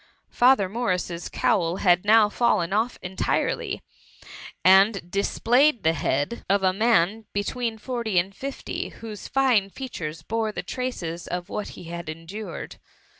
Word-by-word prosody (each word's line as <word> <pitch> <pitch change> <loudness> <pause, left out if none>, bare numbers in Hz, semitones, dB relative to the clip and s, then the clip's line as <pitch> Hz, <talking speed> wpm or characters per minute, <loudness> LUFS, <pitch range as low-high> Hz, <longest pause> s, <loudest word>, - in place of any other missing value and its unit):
Father 245 -5 +4
Morrises 180 -5 -2
cowl 170 -3 +1
had 180 -1 +3
now 215 0 +6
fidlen 205 -5 +1
aS 225 +4 0
entirely, 185 +1 -1 0.8
and 190 -1 +5
displayed 240 +7 +2
the 160 - +3
bead 145 - -1
of 200 0 +2
a 185 -1 +3
man 220 0 +2
between 225 +3 -2
forty 230 -3 -3
and 190 +3 +1
fifty, 275 0 -5
whose 215 -3 -9
fine 250 -8 +2
features 170 - -6
boire 225 0 -1
the - - -5
traces 175 -10 -4
of 175 0 -4
what 210 - -5
he - - -9
had 170 -1 -6
endured. 165 +4 -7
205 Hz, 135 wpm, -25 LUFS, 175-230 Hz, 0.8 s, now